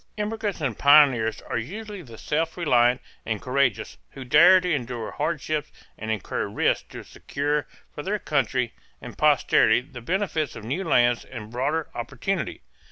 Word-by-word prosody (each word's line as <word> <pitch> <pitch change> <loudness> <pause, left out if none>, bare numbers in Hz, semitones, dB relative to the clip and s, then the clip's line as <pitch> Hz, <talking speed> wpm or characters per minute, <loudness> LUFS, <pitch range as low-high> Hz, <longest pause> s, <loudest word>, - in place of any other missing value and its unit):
Immigrants 210 -3 -3
and 125 -8 -2
pioneers 135 -7 +5
are 120 - -3
usually 205 - -7
the 115 -8 -12
self 160 +7 -2
reliant 125 -6 +3 0.2
and 110 -2 -3
courageous, 130 -2 0 0.2
who 135 - -8
dare 170 +8 +7
to 180 -1 -1
endure 120 -4 -3
hardships 155 -1 -2 0.2
and 110 - -7
incur 110 -3 -2
risks - - 0
to - - -9
secure 145 +1 -3 0.3
for - - -6
their 200 +7 -1
country 130 - -1 0.3
and - - -10
posterity 140 -6 +4
the 125 -1 -11
benefits 165 - -1
of 115 - -9
new 140 - -2
lands 120 -7 +3
and 115 -4 -9
broader 145 +6 -1
opportunity. 130 +9 -3
140 Hz, 155 wpm, -25 LUFS, 120-165 Hz, 0.3 s, dare